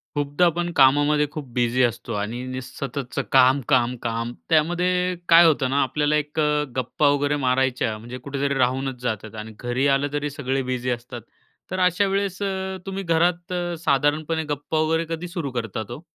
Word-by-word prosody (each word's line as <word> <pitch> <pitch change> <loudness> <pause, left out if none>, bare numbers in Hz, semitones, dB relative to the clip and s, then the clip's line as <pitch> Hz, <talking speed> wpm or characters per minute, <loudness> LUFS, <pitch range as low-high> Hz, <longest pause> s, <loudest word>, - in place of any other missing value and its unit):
खूपदा 145 +4 +1
आपण 175 +1 0
कामामध्ये 145 +2 +4
खूप 150 -3 -7
बिझी 125 +1 +2
असतो 120 0 -1
आणि 115 +4 -4
नी 130 0 -4
सततचं 130 0 -5
काम, 130 +2 +6
काम, 125 -3 +3
काम 115 0 -2 0.2
त्यामध्ये 180 +3 +2
काय 170 +1 +8
होतं 140 -5 +3
ना, 140 +2 +2
आपल्याला 150 +3 0
1 150 +1 -2 0.4
गप्पा 130 +3 +1
वगैरे 145 +1 +1
मारायच्या 125 -4 +1
म्हणजे 120 +3 -8
कुठेतरी 140 +2 -2
राहूनच 130 0 0
जातात 110 -3 -4
आणि 110 +1 -7
घरी 125 +3 0
आलं 140 +1 0
तरी 145 0 -1
सगळे 135 -2 -2
बिझी 125 0 -2
असतात. 120 0 -4 0.5
तर 185 - -2
अशा 180 +2 +3
वेळेस 195 0 -1
अ, 190 -1 -3
तुम्ही 195 0 -4
घरात 175 +1 +1 0.3
साधारणपणे 150 +3 +1
गप्पा 145 +2 -2
वगैरे 160 +1 +1
कधी 175 +2 -7
सुरू 170 -6 -4
करतात 115 -2 -4
हो? 125 - -7
140 Hz, 165 wpm, -23 LUFS, 125-165 Hz, 0.5 s, काय